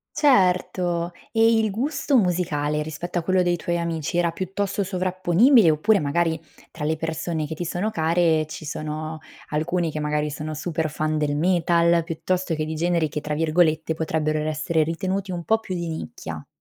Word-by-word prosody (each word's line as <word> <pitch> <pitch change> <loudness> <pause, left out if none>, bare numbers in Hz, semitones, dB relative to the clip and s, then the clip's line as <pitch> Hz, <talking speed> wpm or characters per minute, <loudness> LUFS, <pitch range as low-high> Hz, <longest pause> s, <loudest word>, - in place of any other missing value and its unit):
Certo. 180 - +2 0.2
E 225 0 +4
il 220 -1 +1
gusto 275 +6 0
musicale, 160 -7 +1
rispetto 165 +4 -4
a - - -7
quello 185 +2 +2
dei 175 -1 +2
tuoi 170 +1 -2
amici 165 -1 -2
era 170 -1 +2
piuttosto 195 +3 -2
sovrapponibile, 185 - +4
oppure 200 +7 +3
magari, 160 +2 0 0.3
tra 155 -2 -5
le 160 +1 0
persone 160 0 -3
che 160 - -5
ti 175 - -4
sono 180 +6 -2
care, 160 -1 +2
ci 155 +1 -8
sono 155 +1 -4 0.3
alcuni 165 +2 -1
che 155 - -3
magari 150 0 -1
sono 155 +1 -5
super 155 0 -2
fan 155 0 -1
del 145 -1 0
metal, 170 0 +3
piuttosto 165 +2 -2
che 155 - -1
di 155 +1 -4
generi 170 0 +1
che 150 - -4
tra 150 0 -3
virgolette 160 0 +2
potrebbero 155 -1 -1
essere 155 +1 0
ritenuti 185 +5 -2
un 175 -2 -4
po' 220 +4 +2
più 190 -4 -5
"di 170 -1 -3
nicchia"? 160 - -6
170 Hz, 175 wpm, -24 LUFS, 155-180 Hz, 0.3 s, E